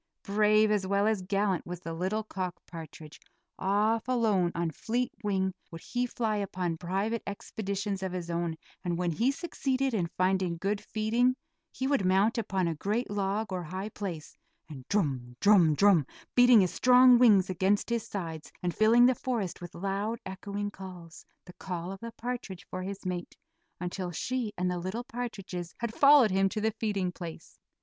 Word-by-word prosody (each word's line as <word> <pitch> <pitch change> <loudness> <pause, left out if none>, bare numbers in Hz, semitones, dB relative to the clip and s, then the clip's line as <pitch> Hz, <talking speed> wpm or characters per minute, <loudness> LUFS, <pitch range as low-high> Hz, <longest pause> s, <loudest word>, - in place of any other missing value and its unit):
Brave 215 +1 +3
as 200 -3 +1
well 200 +1 +2
as 215 -3 +1
gallant 195 -1 0
was 175 0 -5
the 165 -2 -5
little 190 +6 -1
cock 185 -4 -4
partridge. 160 -2 -10 0.4
Off 210 +4 +1
alone, 215 -8 +2
on 170 -1 -1
fleet 240 +9 -2
wing 190 -2 0 0.2
would 165 -1 -9
he 245 0 -2
fly 225 -3 -1
upon 180 -4 -2
private 195 +6 -1
expeditions 200 -1 -4
of 190 -1 -3
his 175 -2 -4
own, 170 -1 -1 0.3
and 175 -2 -1
when 175 -1 0
he 230 - +1
succeeded 270 -4 -1
in 185 -6 0
finding 185 -2 +1
good 200 +4 -1
feeding, 235 +4 +1 0.4
he 260 - -4
would 275 -6 +2
mount 195 +5 +3
upon 190 -5 -1
a 165 - 0
great 210 +9 -2
log, 205 +1 -1
or 180 - -2
high 185 +5 -5
place, 180 -8 -6 0.3
and 135 -5 -10
drum, 135 -11 -1
drum, 185 -7 +5
drum, 185 -6 +4 0.3
beating 245 -3 +7
his 185 - 0
strong 250 -1 +7
wings 210 -6 +6
against 190 +3 +1
his 235 -1 +1
sides, 165 -6 -6
and 175 -1 0
filling 230 +3 +5
the 255 - +5
forest 230 -10 -3
with 175 0 -9
loud 200 +5 -2
echoing 200 +2 -4
calls 180 -4 -11 0.2
the 180 - -12
call 180 -1 -5
of 195 - -7
the 230 +2 -7
partridge 230 -6 -5
for 185 - -4
his 195 +1 -6
mate, 180 -1 -4 0.4
until 180 +1 -4
she 240 +6 -2
and 180 0 0
the 180 - -2
little 190 +7 -4
partridges 215 -9 -6
had 235 -1 -3
followed 280 -6 +6
him 195 +1 +3
to 215 - -3
the 220 +1 +1
feeding 205 -4 -1
place. 170 -2 -9
195 Hz, 175 wpm, -29 LUFS, 180-220 Hz, 0.4 s, beating